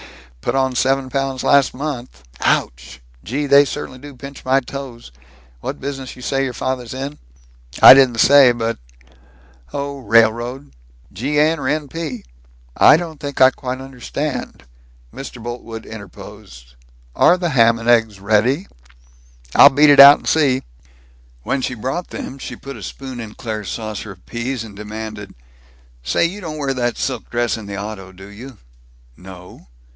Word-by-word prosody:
Put - - -2
on 130 -1 +1
seven 130 +1 0
pounds 135 -2 -2
last 140 -3 +3
month. 125 - -6 0.2
Ouch! 60 +1 -1 0.2
Gee, 140 +6 -3
they 140 0 +6
certainly 130 -2 -6
do 145 0 -12
pinch 140 +2 -11
my 130 +1 +3
toes. 130 - -9 0.5
What - - -6
business 135 -2 -6
you 125 - -12
say 135 +1 -1
your 130 -2 -3
father's 130 -1 -4
in?" 140 +3 -6 0.6
"I - - +13
didn't 130 -3 +4
say, 140 -1 +7
but 115 - -3 0.9
Oh, 140 0 -5
railroad." 120 +3 +1 0.4
"G. 135 +10 -2
N. 155 +2 +2
or 130 - -3
N. 150 0 -1
P.?" 145 -5 -6 0.5
"I - - +7
don't 160 -3 -7
think 145 -2 -6
I 130 0 +7
quite 130 -1 -6
understand 135 - -6 0.3
" - - -30
Mr. 130 -3 -9
Boltwood 115 -1 -7
interposed, 60 - -12 0.4
"Are 180 - +5
the 175 -1 -2
ham 115 -5 +4
and 115 0 -7
eggs 115 -4 +2
ready?" 110 - +1 0.9
"I'll - - +9
beat 145 +2 +5
it 145 - +5
out 140 +1 +11
and - - -12
see." 140 -5 +2 0.8
When 135 - -1
she 130 - -3
brought 130 +10 -4
them, 135 - -8
she - - -7
put 140 0 -10
a - - -11
spoon 130 +5 -8
in 110 -2 -8
Claire's 110 -4 -5
saucer 110 -2 -6
of 90 - -25
peas, 120 0 -4
and 105 -3 -12
demanded, 105 -1 -8 0.7
"Say, 65 - +1
you 195 +5 -4
don't 160 -4 -6
wear 140 -2 -2
that 120 -2 -2
silk 130 - -4
dress 120 -1 -1
in 110 -2 -9
the 100 0 -6
auto, 100 -2 -7
do 95 +1 -13
you?" 115 +4 -12 0.6
"No." 90 +1 -14
130 Hz, 165 wpm, -19 LUFS, 110-140 Hz, 0.9 s, I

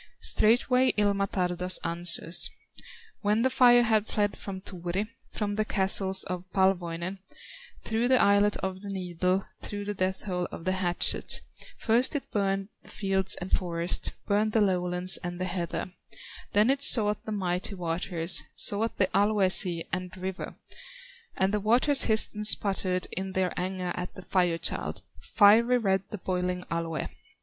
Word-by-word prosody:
Straightway 250 +3 +3
Ilmatar 200 -3 0
thus 180 +1 +1
answers: 170 0 +3 0.7
"When 210 +2 +1
the 260 - +1
fire 245 -1 +5
had 220 -2 +1
fled 205 -1 -1
from 195 -2 -7
Turi, 185 +2 -4 0.2
From 205 -1 -3
the 215 +1 0
castles 190 -1 0
of 180 0 -7
Palwoinen, 185 -1 -1 0.6
Through 225 +2 -1
the 255 0 +3
eyelet 200 +1 +3
of 190 0 -4
the 205 - -8
needle, 185 0 -1 0.2
Through 205 0 -6
the 205 - -3
death 190 -1 -2
hole 180 -3 -3
of 165 - -9
the 185 - +1
hatchet, 180 -2 +2 0.4
First 240 +6 +1
it 285 - -5
burned 195 -1 -1
the - - -18
fields, 195 -2 -1
and 180 +1 -8
forests, 170 -1 -1 0.2
Burned 210 +1 0
the 225 - +3
lowlands, 180 -1 +3
and 175 0 -7
the 185 - -2
heather; 180 0 -4 0.6
Then 210 +5 +4
it 275 0 -1
sought 210 -6 +4
the 220 - -5
mighty 185 -1 -2
waters, 170 0 0
Sought 220 +3 0
the 195 - +3
Alue 200 -1 +2
sea 175 -4 +2
and 185 0 -3
river, 185 +1 -6 0.8
And 190 +2 +1
the 210 - +1
waters 250 +7 +3
hissed 220 -1 +4
and 210 0 -2
sputtered 190 -3 +2
In 190 +1 -4
their 185 -1 -1
anger 180 0 -3
at 180 0 -6
the 185 - -10
Fire 180 -2 0
child, - - -3 0.2
Fiery 230 +4 +4
red 195 -5 0
the 210 - -6
boiling 180 -1 -3
Alue! 165 -3 -3
190 Hz, 160 wpm, -27 LUFS, 180-210 Hz, 0.8 s, fire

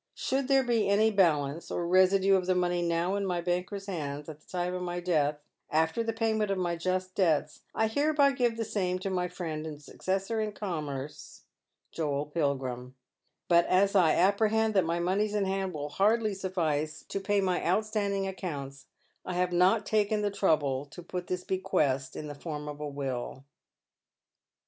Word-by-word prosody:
Should 265 0 -1
there 270 -1 +4
be 230 -5 +1
any 215 +2 +4
balance, 160 -6 +1
or 175 - -2
residue 190 +2 +5
of 185 -1 0
the 185 - +3
money 175 -1 +1
now 170 +2 0
in 200 0 -1
my 180 -3 -1
banker's 180 +3 -2
hands, 150 -6 -4
at 155 -1 -9
the - - -29
time 180 -1 -2
of 180 - -3
my 175 0 -3
death, 155 -4 +1 0.3
after 160 +7 +1
the 225 0 -1
payment 220 -2 0
of 195 - 0
my 175 -2 0
just 185 +2 -2
debts, 155 -6 +1
I 220 - +2
hereby 285 +4 +3
give 245 -4 0
the 225 - -2
same 185 -4 -1
to 190 +1 -4
my 180 -1 0
friend 160 -3 -5
and 150 -2 -7
successor 195 +8 -2
in 215 -1 -2
commerce, 150 -8 -5 0.5
Joel 145 -3 -1
Pilgrim; 130 -5 -2 0.5
but 170 -1 +4
as 195 +2 +3
I 175 -6 +5
apprehend 215 +4 +3
that 190 -4 +3
my 170 +1 0
moneys 200 +4 0
in 205 -2 +1
hand 190 0 -1
will 150 -3 -5
hardly 215 +7 +2
sufiice 160 -6 -2
to - - -3
pay 200 +1 +1
my 185 -2 0
outstanding 200 +1 0
accounts, 140 -8 -6 0.4
I 180 - -4
have 180 0 0
not 190 +4 +4
taken 210 0 +1
the 205 - 0
trouble 145 -8 +1
to 170 +5 -11
put 180 +1 -5
this 180 0 -3
bequest 140 -8 0
in 155 - -5
the 145 - -6
form 150 0 -6
of 150 0 -6
a 150 - -4
will. 135 -2 -4
180 Hz, 180 wpm, -29 LUFS, 155-200 Hz, 0.5 s, residue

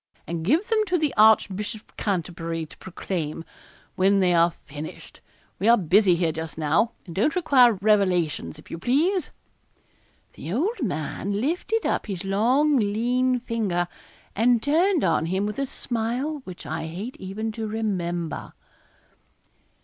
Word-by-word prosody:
and 165 -1 -4
give 310 - +2
them 445 -2 +2
to 360 -1 +2
the 305 -4 0
Archbishop 210 -1 +3
of - - -28
Canterbury 165 -4 -3
to - - -15
proclaim, 165 -4 -4 0.5
when 195 +2 +3
they 180 -2 +3
are 170 0 +5 0.2
finished; 150 +2 -9 0.4
we 200 - 0
are 235 +1 +7
busy 190 +1 +4
here 170 -1 +1
just 160 0 -6
now, 160 +9 +1
and 170 - -9
don't 220 - +1
require 260 -9 +5
revelations, 185 -8 +1
if 155 - -15
you 165 - -5
please.' 315 - +1 1.0
The 165 - -7
old 350 - -1
man 195 - -2
lifted 355 - -1
up - - 0
his 195 -2 -5
long 255 +10 +3
lean 245 +4 +1
finger, 205 -8 -1 0.5
and 235 +1 +3
turned 335 +4 +2
on 165 -2 +2
him 190 +3 0
with 210 +5 -4
a 275 - -1
smile 250 +6 -3
which 180 -2 -9
I 160 - -4
hate 195 +10 -6
even 205 +4 -4
to 220 0 -4
remember. 175 -7 -3
210 Hz, 150 wpm, -25 LUFS, 175-250 Hz, 1.0 s, are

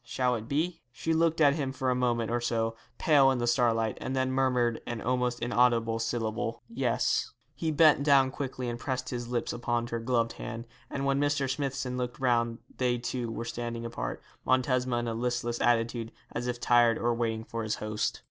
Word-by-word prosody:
Shall 125 +1 0
it 115 -2 -4
be?' 165 +5 -1
She 160 +7 -1
looked 165 0 +2
at 145 -2 +6
him 140 -3 -2
for 130 -1 -1
a - - +1
moment 120 -2 0
or 120 0 0
so, 115 -1 0 0.2
pale 140 -4 +5
in 130 - +1
the 120 - 0
starlight, 115 -2 +2
and 130 - -3
then 130 0 +1
murmured 125 -3 +1
an 120 -1 -3
almost 125 +1 0
inaudible 120 -2 +2
syllable. 115 0 -2
'Yes.' 230 - 0 0.2
He 165 - -2
bent 155 -1 +5 0.3
quickly 130 -2 -4
and 120 0 -3
pressed 130 -1 -3
his 120 -1 -4
lips 120 -1 -2
upon 120 0 -1
her 120 0 -3
gloved 115 -1 0
hand, 115 0 -6 0.2
and 140 0 -3
when 135 0 +2
Mr. 145 -1 +1
Smithson 135 -2 -2
looked 125 -1 -3
round 120 -3 +1 0.2
they 125 -1 +2
two 120 -1 -3
were 115 +1 -4
standing 115 0 -4
apart, 115 - -4 0.2
Montesma 130 -1 +2
in 120 - -4
a 115 - -1
listless 120 0 -2
attitude, 115 -1 +1 0.2
as 120 +1 -3
if 120 -1 -2
tired 120 -2 +4
of 120 0 +1
waiting 115 -1 -1
for 115 0 -5
his 110 -1 -1
host. 105 0 -2
120 Hz, 195 wpm, -29 LUFS, 115-130 Hz, 0.3 s, at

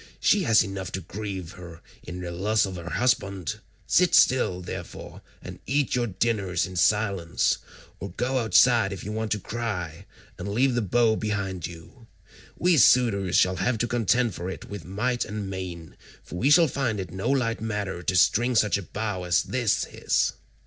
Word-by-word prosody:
She 205 - +3
has 110 -1 +5
enough 95 -2 -6
to 95 - -3
grieve 95 -1 -6
her 85 -3 -12 0.2
in 90 0 -8
the 90 -1 -5
loss 105 +5 +1
of 95 -1 -6
her 85 0 -7
husband; 100 -8 -1 0.3
sit 180 -1 +3
still, 125 -8 +4
therefore, - - -8 0.2
and - - -9
eat 140 +1 0
your 120 -1 +1
dinners 100 -3 -1
in 95 - -9
silence, 95 -1 +1 0.4
or 100 - -6
go 125 +8 -1
outside 110 0 +4
if 95 -3 -6
you 105 - -5
want 110 0 -3
to 105 - -3
cry, 95 -6 -5 0.3
and 90 - -5
leave 125 +5 +2
the 120 - 0
bow 115 +2 +2
behind 100 -5 -3
you. 85 +8 -14 0.5
We 175 -1 +3
suitors 100 -8 +4
shall 90 0 +3
have 110 +7 0
to 120 - -1
contend 120 0 +1
for 90 +1 -5
it 95 - -7
with 100 -5 -8
might 120 +7 -1
and 105 -1 -5
main, 90 -3 -7 0.3
for - - -13
we 135 - +2
shall 165 +2 +6
find 125 -6 -2
it 90 -4 -5
no 95 +6 -3
light 125 -5 0
matter 105 -5 -3
to 95 +1 -1
string 120 +6 +3
such 105 -2 +3
a 95 - -11
bow 105 -3 -3
as 90 0 +2
this 120 -5 0
is. - - 0
105 Hz, 185 wpm, -25 LUFS, 90-120 Hz, 0.5 s, shall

